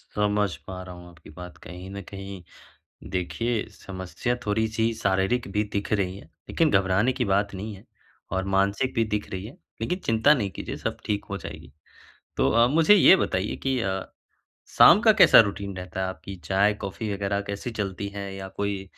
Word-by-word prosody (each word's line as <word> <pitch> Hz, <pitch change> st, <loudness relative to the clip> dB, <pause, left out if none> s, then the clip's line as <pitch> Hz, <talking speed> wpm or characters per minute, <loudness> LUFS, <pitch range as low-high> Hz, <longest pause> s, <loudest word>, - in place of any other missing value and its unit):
समझ 105 Hz, -4 st, +1 dB
पा 95 Hz, -1 st, -6 dB
रहा 90 Hz, -1 st, -9 dB
हूँ 90 Hz, 0 st, -12 dB
आपकी 85 Hz, -3 st, -17 dB
बात 90 Hz, +3 st, -10 dB
कहीं 90 Hz, +2 st, -9 dB
न 100 Hz, 0 st, -6 dB
कहीं। 100 Hz, -1 st, -8 dB, 0.7 s
देखिए, 110 Hz, +5 st, -1 dB
समस्या 95 Hz, +5 st, -4 dB
थोड़ी-सी 110 Hz, +2 st, 0 dB
शारीरिक 100 Hz, +3 st, 0 dB
भी 105 Hz, 0 st, +1 dB
दिख 100 Hz, 0 st, -2 dB
रही 95 Hz, -2 st, -1 dB
है, -, -, -13 dB, 0.2 s
लेकिन 165 Hz, -2 st, +2 dB
घबराने 95 Hz, +5 st, +3 dB
की 125 Hz, -1 st, -1 dB
बात 100 Hz, 0 st, +1 dB
नहीं 105 Hz, +3 st, -6 dB
है 95 Hz, -, -16 dB, 0.5 s
और 95 Hz, 0 st, -1 dB
मानसिक 100 Hz, +7 st, +1 dB
भी 115 Hz, -, +3 dB
दिख 105 Hz, -, -4 dB
रही 95 Hz, +1 st, -5 dB
है, 115 Hz, -, -9 dB, 0.3 s
लेकिन 180 Hz, +2 st, -1 dB
चिंता 115 Hz, +6 st, +4 dB
नहीं 105 Hz, -9 st, -1 dB
कीजिए -, -, -6 dB
सब -, -, -4 dB
ठीक 105 Hz, -1 st, -2 dB
हो 100 Hz, -, -3 dB
जाएगी। -, -, -10 dB, 0.7 s
तो -, -, +3 dB
अ, 115 Hz, +1 st, +5 dB
मुझे 165 Hz, +8 st, +5 dB
ये 190 Hz, -1 st, +8 dB
बताइए 95 Hz, -, -1 dB
कि 130 Hz, -2 st, +1 dB
अ, 95 Hz, -3 st, -1 dB, 0.8 s
शाम 200 Hz, -, +9 dB
का 225 Hz, -2 st, +6 dB
कैसा 205 Hz, -, +8 dB
रूटीन 100 Hz, -2 st, -4 dB
रहता 90 Hz, 0 st, -5 dB
है 95 Hz, -, 0 dB
आपकी 95 Hz, +1 st, -7 dB
चाय, 100 Hz, +4 st, +3 dB
कॉफ़ी 105 Hz, +1 st, -5 dB
वगैरह 100 Hz, 0 st, -1 dB
कैसी 100 Hz, +4 st, -5 dB
चलती 100 Hz, 0 st, -3 dB
है 100 Hz, -1 st, -5 dB
या 95 Hz, 0 st, -7 dB
कोई 100 Hz, 0 st, -3 dB
100 Hz, 185 wpm, -25 LUFS, 95-110 Hz, 0.8 s, शाम